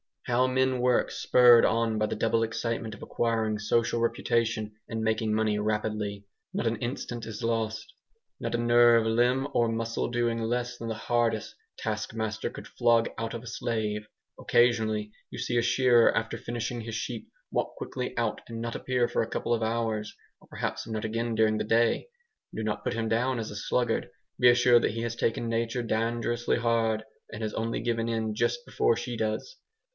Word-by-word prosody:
How 125 +1 +2
men 130 0 +1
work 125 0 +2
spurred 120 -2 +6
on 115 -1 +1
by 110 - +2
the - - -3
double 115 0 +1
excitement 115 -1 -2
of - - -12
acquiring 110 -2 0
social 115 +2 +1
reputation 115 -2 0
and 110 -1 -3
making 110 0 +1
money 110 -1 +1
rapidly! 105 -1 -2 0.3
Not - - -1
an 115 0 +1
instant 120 0 -4
is 110 -2 -7
lost; 115 -1 -2 0.5
not - - -2
a - - +2
nerve, 120 -1 +5
limb, 120 +4 +2
or 120 - +3
muscle 115 0 -2
doing 120 -1 0
less 120 +1 -2
than 115 - -6
the 115 - -1
hardest 115 -2 0 0.2
task 110 0 -3
master 110 -1 -2
could - - -10
flog 115 -1 +2
out 115 +1 -3
of 115 - -6
a - - -10
slave. 110 -3 -2 0.3
Occasionally 110 -3 +2 0.2
you - - -8
see 120 - -1
a - - +4
shearer, 120 -1 +4
after 115 0 -1
finishing 120 0 -4
his 115 0 -6
sheep, 115 0 -4 0.2
walk - - -1
quickly - - -5
out - - -1
and 115 -1 -6
not 115 0 -4
appear 125 -2 0
for - - 0
a 110 - -2
couple 120 - -1
of 115 - 0
hours, 110 -1 -1 0.2
or - - -21
perhaps - - -4
not 110 -1 -3
again 115 +1 -2
during 110 -1 +3
the - - -1
day. 115 - +2 0.5
Do 110 - -3
not 105 -1 -2
put - - -1
him 115 0 -1
down 125 +3 +1
as 110 -2 -4
a - - -8
sluggard; 115 +1 0 0.3
be 125 - +7
assured 120 0 +5
that - - +2
he 115 +2 -4
has 115 0 -2
tasked 115 - 0
nature 115 +1 -1
dangerously 115 +1 0
hard, 115 -2 +1 0.3
and 110 +1 -6
has 110 - -2
only 115 +1 -2
given 115 -1 -1
in 110 -1 -1
just 120 +2 -1
before 115 - +2
she 120 +1 -4
does. 110 - -3
115 Hz, 190 wpm, -28 LUFS, 110-120 Hz, 0.5 s, be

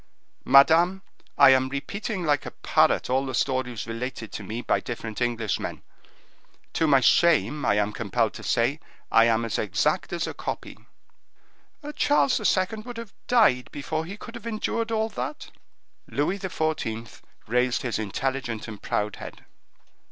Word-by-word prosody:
"Madame, 165 +8 +5 0.3
I 140 -2 +8
am 130 0 +3
repeating 185 - -4
like 145 -3 +1
a - - -3
parrot - - +2
all 130 +2 +1
the 130 - -3
stories 125 -4 -1
related 115 -1 -5
to - - -6
me 110 +5 -5
by - - +1
different 115 -1 -6
Englishmen. 115 -4 -2 0.9
To 160 - +1
my 135 -3 +5
shame 150 0 +3
I 105 - +3
am 105 0 0
compelled 115 +1 0
to - - -9
say, 125 +5 +1 0.3
I 115 - +6
am 115 0 +2
as 115 - -2
exact 150 - 0
as 170 -2 -1
a - - -5
copy." - - -6 1.2
"Charles 285 -3 +3
II. 205 0 +1
would 240 +2 -8
have 230 -3 -8
died 210 - +3
before 155 +3 -3
he 195 +4 -8
could 230 - -10
have 235 -2 -8
endured 230 +1 -2
all 220 0 0
that." 135 - -6 0.6
Louis 165 +8 -1
XIV. 155 - -3 0.2
raised 125 +2 +1
his 120 -3 -2
intelligent 120 +2 -3
and 105 -3 -9
proud 105 0 -2
head. - - -10
135 Hz, 150 wpm, -25 LUFS, 115-180 Hz, 1.2 s, I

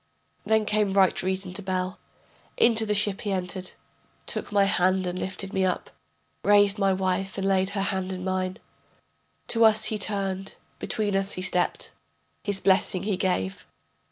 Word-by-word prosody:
Then 220 -1 +3
came 210 -2 +1
right 190 -2 +3
reason 185 0 -2
to 205 - -3
Bel, 185 -1 -3 0.6
Into 225 -2 +4
the 210 - +1
ship 205 -1 0
he 205 - -3
entered, 185 0 -3 0.5
Took - - -4
my 200 -1 +4
hand 185 -1 +2
and 180 0 -3
lifted 190 +1 -5
me 190 - +1
up, 185 -1 -1 0.5
Raised 205 0 +4
my 195 -1 +3
wife 190 +1 -1
and 195 0 -1
laid 190 -1 +2
her 195 - +1
hand 190 -1 -2
in 185 -1 -5
mine, 185 0 -2 0.9
To 230 -1 +3
us 220 -1 +5
he 215 -1 -2
turned, 195 -2 -2 0.2
between 210 -4 -1
us 195 0 0
he 185 - -4
stepped, 180 -1 0 0.5
His 200 -2 -1
blessing 190 -1 +3
he 205 -1 0
gave. 180 - -2
195 Hz, 165 wpm, -26 LUFS, 185-205 Hz, 0.9 s, us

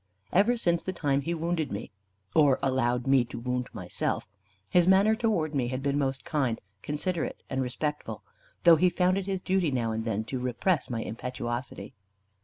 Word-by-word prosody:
Ever 210 +7 +4
since 170 -6 +1
the 185 - -4
time 140 -5 +1
he 170 +5 -2
wounded 165 -1 -1
me, 100 +3 -5 0.4
or 145 -4 +5
allowed 125 -2 +1
me 135 -2 +5
to 115 - -8
wound 125 +1 -2
myself, - - -3 0.4
his 175 - +4
manner 195 +3 +5
towards 215 -10 0
me 130 -4 0
had 130 +2 -3
been 140 0 +1
most 135 -1 -1
kind, 130 -7 0 0.2
considerate, 160 +3 -3
and 135 0 0
respectful; 150 +4 -3 0.4
though 170 -2 +8
he 180 +3 +4
found 185 +2 +2
it 195 - -6
his 190 -2 -2
duty 185 -3 +2
now 120 -4 0
and 110 0 -2
then 110 -2 -1
to 125 +4 -4
repress 125 +7 0
my 115 -2 -2
impetuosity. 120 -2 -5
140 Hz, 180 wpm, -28 LUFS, 125-175 Hz, 0.4 s, though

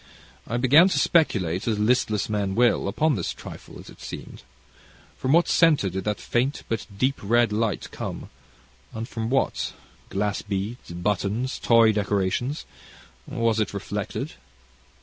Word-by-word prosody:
I 120 - -1
began 145 +9 +6
to - - 0
speculate, 100 - +2
as 110 -2 +1
listless 105 -1 +1
men 100 -2 -1
will, 120 -4 +3
upon 155 +10 +2
this 90 -9 -2
trifle, - - -10
as - - -12
it - - -14
seemed. - - -8 0.7
From 130 - -1
what 170 +3 +5
centre 150 - +4
did 95 +1 -4
that 105 -2 -1
faint 130 +4 -1
but 115 -2 -3
deep 130 +5 +1
red 120 +2 +3
light 110 0 -1
come, - - -6 0.6
and 110 +1 -4
from 115 -2 -4
what 135 +1 0 0.4
glass 105 +1 -1
beads, 105 +4 -4
buttons, 105 +7 -1
toy 115 -2 +5
decorations 105 +6 -1 0.6
was 115 -1 0
it 105 -2 -1
reflected? 100 - -4
110 Hz, 145 wpm, -25 LUFS, 100-125 Hz, 0.7 s, began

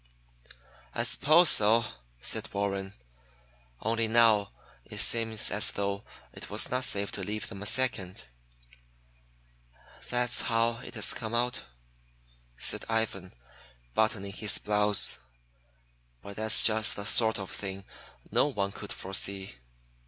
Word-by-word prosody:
"I - - -1
suppose 160 +4 +4
so," 110 +2 +4 0.4
said - - -2
Warren. 100 -1 -3 0.9
"Only 115 0 0
now 110 -3 +3 0.3
it - - -10
seems 115 -2 +3
as 105 +2 +3
though 100 0 -3 0.3
it - - -10
was - - 0
not 125 +1 +1
safe 100 -4 0
to 100 - -6
leave 105 +2 -4
them 100 - -10
a 105 - -3
second." 100 -8 -1 1.9
"That's 120 0 +1
how 115 0 0
it - - -10
has - - +1
come 115 -1 -5
out," 125 +1 -2 0.9
said - - 0
Ivan, 110 -5 -3 0.6
buttoning 100 -3 -1
his 105 0 -1
blouse, 105 -7 +5 1.0
"but 100 0 -10
that's 110 0 +5
just 110 0 +3
the 100 - -6
sort 110 +1 +2
of 95 -2 -7
thing 95 -1 -6 0.5
no - - +2
one 100 -8 -3
could 100 0 -9
foresee. 95 -2 -3
105 Hz, 125 wpm, -28 LUFS, 100-115 Hz, 1.9 s, blouse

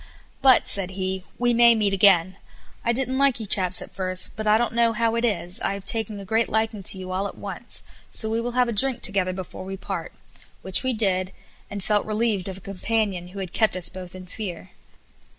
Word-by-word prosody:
"But," 265 -2 +5
said 195 -2 +3
he, 190 -1 -3
"we 240 0 +2
may 235 0 +6
meet 205 -3 +1
again. 185 -2 +4 0.5
I 235 - +2
didn't 260 +2 0
like 275 -4 +3
you 220 - -5
chaps 185 -2 +3
at - - -14
first, 185 -1 -1
but 215 -1 -4
I 210 +1 +5
don't 235 -1 -1
know 235 -1 +3
how 225 +1 +1
it 230 0 -1
is, 195 -6 -1
I 200 - -1
have 200 -1 -9
taking 220 -1 +1
a 195 - -9
great 225 +4 +1
liking 220 -1 -1
to 190 - +1
you 185 0 -7
all 190 +2 -1
at - - -11
once, - - -5 0.3
so 220 - +1
we 225 +1 0
will 240 +1 -4
have 250 0 +2
a - - -1
drink 260 +4 +2
together 195 -2 +1
before 185 0 -7
we 195 +1 -6
part;" - - -5 0.5
which 190 -1 +2
we 260 -1 0
did, 190 -4 0 0.4
and 200 -1 -5
felt 210 +1 +1
relieved 215 -3 0
of 190 - -7
a - - -13
companion 195 -1 -2
who 185 +2 -12
had 185 -1 -7
kept 220 -3 +2
us 180 -1 +2
both 185 -1 -10
in 185 0 -9
fear. 185 -1 -7
200 Hz, 225 wpm, -24 LUFS, 185-230 Hz, 0.5 s, may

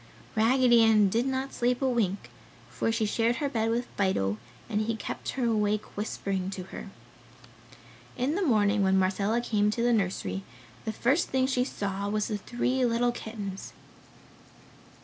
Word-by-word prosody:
Raggedy 240 +1 +5
Ann 215 -3 +5
did 230 +6 +1
not 265 0 -2
sleep 245 +1 +1
a 270 - +1
wink, 200 - -1 0.4
for 125 - 0
she 225 -1 0
shared 230 +3 +1
her 285 - -1
bed 225 -4 0
with 235 +2 0
Fido 110 - 0 0.3
and 215 -2 0
he 225 +1 -1
kept 220 - -5
her 255 - +1
awake 215 -2 0
whispering 195 -2 -2
to 190 -1 -5
her. - - -7 1.3
In 260 +4 0
the 395 - -1
morning 210 - +3
when 190 0 +3
Marcella 200 +5 +1
came 210 -3 +1
to 230 +2 -1
the 240 0 +3
nursery, 180 - -1 0.4
the 220 - -1
first 270 +9 +1
thing 260 0 +2
she 260 -2 +1
saw 200 -5 -3
was 210 +1 -1
the 210 -2 -2
three 250 +4 -1
little 240 0 +2
kittens. 210 -5 -7
220 Hz, 165 wpm, -28 LUFS, 200-245 Hz, 1.3 s, Raggedy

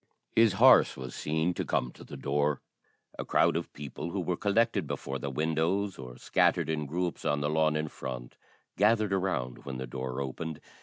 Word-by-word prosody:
His 115 -3 +5
horse 95 - +6
was 65 -2 -6
seen 80 +3 0
to - - -2
come 60 - -1
to - - -13
the - - -9
door. 75 0 0 0.6
A - - -1
crowd - - +3
of - - -3
people 75 +3 -6
who 95 - -3
were 90 0 -1
collected 110 +5 +1
before 70 0 -4
the 70 - -3
windows, 80 +7 0
or 65 -1 -8
scattered - - +2
in 75 -2 -2
groups 85 +3 -2
on 75 0 +1
the 75 - 0
lawn 80 0 +2
in 75 0 -1
front, 65 -4 -7 0.4
gathered 105 0 +3
around 90 -10 -1
when 65 -2 -5
the 65 - -4
door 65 +1 -4
opened. 75 +4 -4
75 Hz, 190 wpm, -30 LUFS, 70-90 Hz, 0.6 s, horse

